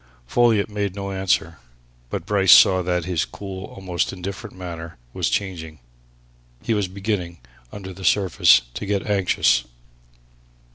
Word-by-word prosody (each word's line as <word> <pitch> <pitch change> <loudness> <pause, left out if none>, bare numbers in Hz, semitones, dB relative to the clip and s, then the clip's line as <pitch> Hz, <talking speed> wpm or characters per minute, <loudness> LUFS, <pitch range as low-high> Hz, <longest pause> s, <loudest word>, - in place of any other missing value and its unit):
Folliot 115 - +2
made 100 -2 -3
no 100 -1 -5
answer. 95 -4 -1 0.5
But - - -4
Bryce 95 -3 +3
saw 95 +3 +7
that 90 -1 -1
his 90 -3 0
cool, 95 -1 -8
almost 90 -3 -3
indifferent 95 +3 -7
manner 85 -3 -8 0.2
was - - -1
changing 85 -6 -3 0.9
he 115 - 0
was 105 -3 0
beginning, 95 -3 -3 0.3
under 95 -2 -8
the 95 +1 -11
surface, 95 -10 +4
to 100 - -6
get 100 -1 -1
anxious. 95 - +2
95 Hz, 135 wpm, -22 LUFS, 90-100 Hz, 0.9 s, saw